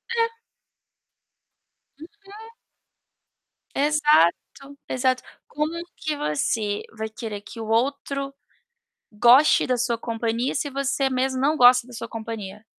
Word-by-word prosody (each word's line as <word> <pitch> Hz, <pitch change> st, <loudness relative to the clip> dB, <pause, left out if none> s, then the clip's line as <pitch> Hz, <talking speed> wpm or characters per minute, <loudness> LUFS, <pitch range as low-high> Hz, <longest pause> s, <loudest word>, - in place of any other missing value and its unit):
É. 460 Hz, 0 st, 0 dB, 1.6 s
Uhum. 410 Hz, +6 st, -13 dB, 1.3 s
Exato, 285 Hz, -, +2 dB
exato. 255 Hz, 0 st, 0 dB, 0.2 s
Como 300 Hz, +1 st, -2 dB, 0.3 s
que 305 Hz, -1 st, -3 dB
você 205 Hz, -, -1 dB
vai 220 Hz, 0 st, -4 dB
querer 220 Hz, -2 st, -7 dB
que 225 Hz, +2 st, -11 dB
o 220 Hz, -, -5 dB
outro 275 Hz, +4 st, -1 dB, 0.8 s
goste 245 Hz, +7 st, +5 dB
da 255 Hz, -1 st, +1 dB
sua 235 Hz, -1 st, -1 dB
companhia 230 Hz, +2 st, -2 dB
se 285 Hz, 0 st, -2 dB
você 275 Hz, 0 st, 0 dB
mesmo 260 Hz, 0 st, -1 dB
não 300 Hz, +3 st, +2 dB
gosta 250 Hz, -1 st, +6 dB
da 250 Hz, -, -14 dB
sua 230 Hz, -, -7 dB
companhia? 220 Hz, -2 st, -7 dB
255 Hz, 115 wpm, -24 LUFS, 225-285 Hz, 1.6 s, gosta